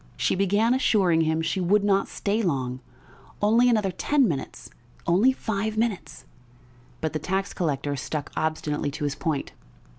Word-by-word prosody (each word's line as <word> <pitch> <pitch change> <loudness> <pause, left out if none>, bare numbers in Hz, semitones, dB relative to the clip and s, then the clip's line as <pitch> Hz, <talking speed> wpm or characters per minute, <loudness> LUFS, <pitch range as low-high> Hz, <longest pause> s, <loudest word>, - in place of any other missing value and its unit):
She - - +1
began 205 +5 +2
assuring 190 -10 +3
him 160 0 +1
she 165 +4 -1
would 200 +3 +3
not 195 -1 +2
stay 210 +2 -1
long, 130 - -1 0.6
only 230 +4 +4
another 210 -5 +2
ten 280 +7 +2
minutes, 145 -7 -5 0.3
only 200 +10 +4
five 220 -3 -3
minutes; 220 -5 -2 0.8
but 160 0 -2
the 155 - -1
tax 190 +5 -2
collector 145 -4 -1
stuck 145 +2 -4
obstinately 155 -2 -1
to 150 +2 -6
his 145 -1 0
point. 155 -1 -3
185 Hz, 150 wpm, -25 LUFS, 155-210 Hz, 0.8 s, only